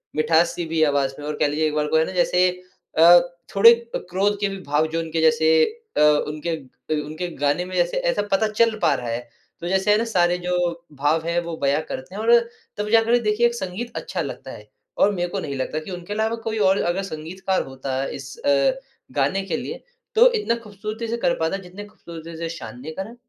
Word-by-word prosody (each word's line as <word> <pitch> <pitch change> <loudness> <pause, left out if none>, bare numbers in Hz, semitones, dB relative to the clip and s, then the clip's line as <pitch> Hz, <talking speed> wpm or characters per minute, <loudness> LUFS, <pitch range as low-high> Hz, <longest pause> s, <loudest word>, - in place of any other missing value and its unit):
मिठास 165 +2 +3
सी 175 - -3
भी 160 0 -1
आवाज़ 140 -2 +1
में 145 - -7
और 150 - -3
कह - - +3
लीजिये 155 +2 0
एक 150 - -3
बार 150 0 0
को 160 - +2
है 160 - +3
ना - - -5
जैसे 180 0 +3 0.5
अ, 170 +2 +9 0.4
थोड़े 230 +4 +9 0.2
क - - -2
क्रोध 200 +3 +1
के 205 - +1
भी 195 - -5
भाव 150 0 +1
जो 165 - 0
उनके 165 0 -2
जैसे 160 0 +4 0.5
अ, - - +4 0.3
उनके 155 +2 -3 0.5
उनके 155 +4 -5
गाने 145 +5 0
में 185 - -7
जैसे 175 -1 +1
ऐसा 170 +4 +1
पता 205 +3 +3
चल 220 +1 +2
पा - - +4
रहा 125 - -4
है। 115 - -1 0.4
तो 175 - -4
जैसे 190 +2 +2
है 210 - +5
ना 225 - +1
सारे 180 -5 +2
जो 180 0 -3 0.5
भाव 155 +3 +1
है 170 +1 +1
वो 170 -1 -5
बयाँ 140 +2 +2
करते 155 +9 -7
है 215 - -4
और 230 +1 +2 0.5
तब 210 0 -3
जा 225 0 +6
कर 235 +2 +3
देखिये 210 +3 +3
एक 235 - -4
संगीत 205 +4 -5
अच्छा - - -3
लगता - - -6
है। - - -11 0.3
और 205 - +5
मेरे 175 -2 -1
को 195 +2 -3
नहीं 140 -5 -4
लगता 130 +4 -2
कि 155 +5 -9
उनके 180 +2 -6
अलावा 220 +2 0
कोई 220 0 -2
और 195 - +3
अगर 175 +3 0
संगीतकार 185 +2 -3
होता 135 0 -4
इस 135 0 -7
अ, 140 - +3 0.4
गाने 145 +8 +1
के 195 - -2
लिए 450 - -6 0.3
तो 485 +2 +7
इतना 420 - 0
खूबसूरती 215 +2 -6
से 235 +1 -2
कर 260 +1 +1
पाता 160 +4 0
है 195 - -6
जितनी 185 +3 -9
खूबसूरती 170 -5 -11
से 165 0 -4
शान 165 -6 -8
ने 155 - -6
करा। 220 +5 -6
175 Hz, 230 wpm, -23 LUFS, 155-210 Hz, 0.5 s, अ